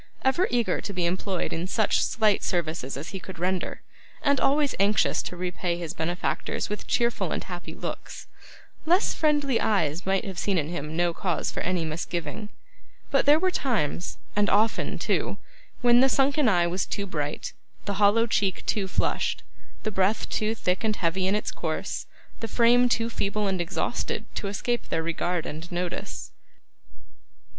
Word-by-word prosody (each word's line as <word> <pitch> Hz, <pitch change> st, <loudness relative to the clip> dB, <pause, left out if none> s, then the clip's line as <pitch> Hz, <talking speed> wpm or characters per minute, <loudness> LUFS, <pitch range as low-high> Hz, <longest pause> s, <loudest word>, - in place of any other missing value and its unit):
Ever 305 Hz, +8 st, +3 dB
eager 240 Hz, -2 st, +1 dB
to 200 Hz, -, -5 dB
be 180 Hz, -2 st, 0 dB
employed 185 Hz, +1 st, -1 dB
in 170 Hz, +3 st, -2 dB
such 215 Hz, +2 st, +2 dB
slight 215 Hz, -2 st, +2 dB
services 160 Hz, -6 st, -1 dB
as 145 Hz, -, -6 dB
he 195 Hz, -, -5 dB
could 185 Hz, -1 st, -9 dB
render, 185 Hz, +2 st, -2 dB, 0.4 s
and 280 Hz, -2 st, +3 dB
always 285 Hz, +1 st, +3 dB
anxious 200 Hz, +1 st, +3 dB
to -, -, -6 dB
repay 180 Hz, -1 st, -2 dB
his 170 Hz, -3 st, -4 dB
benefactors 175 Hz, +3 st, -2 dB
with 210 Hz, -, -5 dB
cheerful 235 Hz, 0 st, +1 dB
and -, -, -2 dB
happy -, -, -7 dB
looks, -, -, -6 dB, 0.6 s
less 360 Hz, +5 st, +4 dB
friendly 290 Hz, -5 st, +2 dB
eyes 170 Hz, -5 st, +1 dB
might 195 Hz, 0 st, +2 dB
have 190 Hz, -3 st, -5 dB
seen 200 Hz, -2 st, +1 dB
in 155 Hz, -2 st, 0 dB
him 155 Hz, -2 st, -4 dB
no 175 Hz, -1 st, +2 dB
cause 180 Hz, 0 st, -1 dB
for -, -, -4 dB
any 180 Hz, -2 st, 0 dB
misgiving. 170 Hz, +4 st, -4 dB, 0.6 s
But 275 Hz, 0 st, +3 dB
there 295 Hz, +1 st, +8 dB
were 370 Hz, +3 st, +2 dB
times, 200 Hz, -, -1 dB, 0.2 s
and 205 Hz, 0 st, +3 dB
often 220 Hz, +2 st, +2 dB
too, -, -, 0 dB, 0.4 s
when 240 Hz, 0 st, +6 dB
the 265 Hz, +1 st, +6 dB
sunken 275 Hz, 0 st, +3 dB
eye 175 Hz, -4 st, +4 dB
was 180 Hz, +2 st, -1 dB
too 200 Hz, -, -2 dB
bright, 150 Hz, -5 st, -3 dB, 0.3 s
the 200 Hz, 0 st, -2 dB
hollow 210 Hz, +3 st, +5 dB
cheek 195 Hz, -4 st, 0 dB
too 200 Hz, -3 st, 0 dB
flushed, -, -, 0 dB, 0.4 s
the 215 Hz, -, -1 dB
breath 195 Hz, +2 st, +1 dB
too 215 Hz, +1 st, 0 dB
thick 185 Hz, -1 st, 0 dB
and 215 Hz, -1 st, +1 dB
heavy 185 Hz, +1 st, 0 dB
in 195 Hz, -, +2 dB
its 210 Hz, -, -1 dB
course, -, -, -3 dB, 0.3 s
the 225 Hz, -, -3 dB
frame 240 Hz, +2 st, +5 dB
too 230 Hz, -1 st, +2 dB
feeble 210 Hz, 0 st, -1 dB
and 190 Hz, -2 st, 0 dB
exhausted, 170 Hz, -, -2 dB
to 200 Hz, -, -3 dB
escape 235 Hz, +4 st, -2 dB
their 160 Hz, -, 0 dB
regard 170 Hz, +1 st, -1 dB
and 160 Hz, +4 st, -6 dB
notice. 175 Hz, 0 st, -4 dB
195 Hz, 170 wpm, -26 LUFS, 175-230 Hz, 0.6 s, there